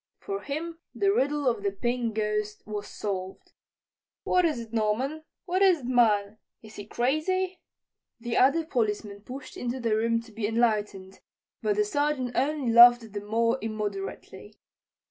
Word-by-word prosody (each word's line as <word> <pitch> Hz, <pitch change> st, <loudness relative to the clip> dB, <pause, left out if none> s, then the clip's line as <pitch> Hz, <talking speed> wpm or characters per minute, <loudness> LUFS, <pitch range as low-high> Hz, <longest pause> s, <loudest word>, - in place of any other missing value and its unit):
For 395 Hz, 0 st, -5 dB
him 325 Hz, +4 st, -5 dB, 0.2 s
the 395 Hz, -1 st, +2 dB
riddle 290 Hz, -3 st, +1 dB
of 235 Hz, -4 st, +1 dB
the 200 Hz, -, 0 dB
Pink 235 Hz, +2 st, -2 dB
Ghost 210 Hz, -1 st, -2 dB
was 210 Hz, -1 st, -5 dB
solved. 190 Hz, -2 st, -5 dB, 0.7 s
"What 360 Hz, -1 st, +3 dB
is 305 Hz, -7 st, 0 dB
it, 230 Hz, -1 st, -9 dB
Norman? 250 Hz, +8 st, -1 dB, 0.2 s
What 370 Hz, +1 st, 0 dB
is 370 Hz, -6 st, +5 dB
it, -, -, -9 dB
man? 220 Hz, -4 st, +2 dB, 0.2 s
Is 220 Hz, 0 st, -13 dB
he 205 Hz, -, -8 dB
crazy?" 350 Hz, +11 st, 0 dB, 0.6 s
The 235 Hz, 0 st, -4 dB
other 310 Hz, +5 st, +4 dB
policemen 210 Hz, -6 st, -2 dB
pushed 260 Hz, +5 st, -9 dB
into 245 Hz, +1 st, -3 dB
the 230 Hz, -3 st, +1 dB
room 230 Hz, +1 st, +1 dB
to 230 Hz, 0 st, -16 dB
be 215 Hz, -1 st, -2 dB
enlightened, 210 Hz, -4 st, -1 dB, 0.4 s
but 415 Hz, -, +1 dB
the 420 Hz, 0 st, +2 dB
Sergeant 290 Hz, -8 st, -1 dB
only 275 Hz, -3 st, 0 dB
laughed 240 Hz, -2 st, +7 dB
the 205 Hz, -, -4 dB
more 230 Hz, +4 st, 0 dB
immoderately. 205 Hz, -1 st, -6 dB
235 Hz, 155 wpm, -27 LUFS, 210-290 Hz, 0.7 s, laughed